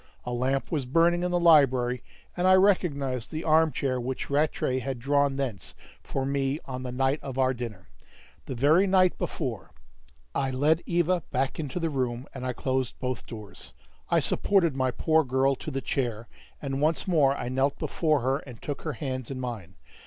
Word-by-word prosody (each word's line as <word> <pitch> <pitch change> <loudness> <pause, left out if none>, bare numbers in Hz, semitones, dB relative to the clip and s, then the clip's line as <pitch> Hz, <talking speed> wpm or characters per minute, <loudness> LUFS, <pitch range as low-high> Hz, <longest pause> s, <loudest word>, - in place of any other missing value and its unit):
A 125 - -3
lamp 130 +3 -1
was 145 -6 -1
burning 170 +5 +3
in 180 - 0
the 175 0 +1
library, 130 -7 +4 0.3
and 180 +1 +1
I 185 - +7
recognized 145 - +1
the 155 +1 -4
arm 160 0 +4
chair 130 -1 -1
which 130 +3 -4
Rattray 140 -3 +1
had 130 0 -4
drawn 140 +2 +1
thence 130 -7 -4 0.3
for 135 -1 -3
me 140 +1 0
on 130 -1 -5
the 125 -1 -5
night 135 +3 +1
of 135 -2 -6
our 130 0 +3
dinner 115 -7 -7 0.6
the 130 - -4
very 155 +10 +4
night 185 -1 +4
before! - - -4 0.6
I 135 - 0
led 150 +5 +2
Eva 175 +1 +2
back 135 +4 -1
into 150 +2 -3
the 165 -2 -1
room, 125 -2 -2
and 130 - -7
I - - 0
closed 130 0 -2
both 125 -2 -4
doors. 105 - -10 0.4
I - - +4
supported 170 -8 +2
my 130 -1 +1
poor 160 +5 +2
girl 135 +1 +2
to - - -6
the 135 -2 -3
chair, 120 -5 -2 0.3
and 135 -1 -3
once 160 +5 +1
more 145 -6 +3
I 120 - -4
knelt 135 +2 0
before 155 -4 0
her 135 +3 +1
and 125 -7 -12
took 145 -2 -5
her 155 - -3
hands 130 0 -4
in 135 -2 -5
mine. 110 -8 -6
135 Hz, 190 wpm, -27 LUFS, 125-155 Hz, 0.6 s, I